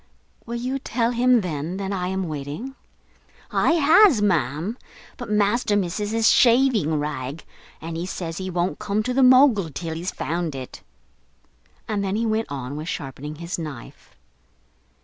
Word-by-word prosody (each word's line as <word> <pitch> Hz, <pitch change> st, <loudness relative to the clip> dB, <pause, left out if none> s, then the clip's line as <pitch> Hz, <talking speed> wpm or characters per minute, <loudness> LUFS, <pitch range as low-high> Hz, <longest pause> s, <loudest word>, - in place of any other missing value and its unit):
"Will 235 Hz, -, -4 dB
you 255 Hz, +3 st, -2 dB
tell 235 Hz, -2 st, -1 dB
him, 245 Hz, 0 st, +3 dB
then, 165 Hz, 0 st, -4 dB
that 195 Hz, 0 st, -4 dB
I 180 Hz, -2 st, -2 dB
am 190 Hz, -1 st, -2 dB
waiting?" 150 Hz, -, -6 dB, 0.8 s
"I -, -, +3 dB
has, 330 Hz, -, +6 dB
ma'am; 170 Hz, -, 0 dB, 0.4 s
but 245 Hz, -4 st, -8 dB
master 210 Hz, +1 st, +2 dB
misses 205 Hz, +2 st, -1 dB
his 225 Hz, +1 st, +2 dB
shaving 235 Hz, -, +4 dB
rag, 145 Hz, 0 st, -4 dB, 0.4 s
and 165 Hz, +1 st, -6 dB
he 170 Hz, +2 st, -4 dB
says 170 Hz, -2 st, -5 dB
he 190 Hz, 0 st, -4 dB
won't 175 Hz, -3 st, -1 dB
come 210 Hz, +1 st, -1 dB
to 250 Hz, -, -2 dB
the 270 Hz, -, +2 dB
Mogul 255 Hz, -, +5 dB
till 160 Hz, +3 st, -5 dB
he's 170 Hz, +3 st, -3 dB
found 165 Hz, -2 st, -3 dB
it." 130 Hz, -1 st, -8 dB, 1.1 s
And 205 Hz, -2 st, -1 dB
then 195 Hz, 0 st, -1 dB
he 230 Hz, +2 st, 0 dB
went 220 Hz, -3 st, -1 dB
on 135 Hz, 0 st, -5 dB
with 155 Hz, +2 st, -6 dB
sharpening 145 Hz, -3 st, -6 dB
his 170 Hz, +3 st, -5 dB
knife. 135 Hz, -, -9 dB
190 Hz, 160 wpm, -23 LUFS, 155-230 Hz, 1.1 s, has